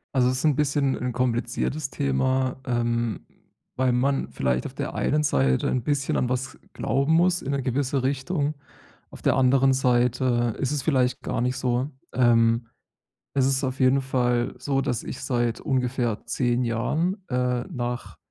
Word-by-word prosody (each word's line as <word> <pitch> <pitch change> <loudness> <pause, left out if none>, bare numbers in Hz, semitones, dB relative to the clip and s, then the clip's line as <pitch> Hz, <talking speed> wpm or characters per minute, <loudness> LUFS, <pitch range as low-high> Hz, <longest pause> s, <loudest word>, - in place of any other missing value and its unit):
Also, 125 -1 +4
es 130 - 0
ist 155 - -2
'n 150 -3 +4
bisschen 140 -2 +1
'n 125 0 -3
kompliziertes 125 +4 -1
Thema, 130 -2 0
ähm, 120 -4 -1 0.5
weil 130 -1 +2
man 135 +3 +1
vielleicht 65 -1 -1
auf - - -6
der - - -4
einen 150 +1 +1
Seite 65 - +2
ein 125 - -1
bisschen 140 +1 0
an 125 - +1
was 130 +2 -3
glauben 140 +6 0
muss 175 +2 +3
in 140 - -3
'ne 140 -1 -1
gewisse 130 +1 0
Richtung. 145 +3 -1 0.5
Auf - - -13
der - - +2
anderen 135 +1 +4
Seite 125 -2 +1
ist 135 - -1
es 145 -3 -1
vielleicht 130 -5 +1
gar - - -3
nicht 125 +1 0
so. 125 +2 0 0.2
Ähm. 115 -1 +3 0.7
Es 135 -2 +2
ist 135 +1 +1
auf 130 0 -2
jeden 130 +1 +4
Fall 125 -2 0
so, 135 -1 0
dass 125 -4 -2
ich - - -7
seit 120 -3 0
ungefähr 125 -4 -1
10 120 0 0
Jahren, 150 - 0
äh, 125 -1 0
nach 125 -6 -4
130 Hz, 165 wpm, -25 LUFS, 120-135 Hz, 0.7 s, Also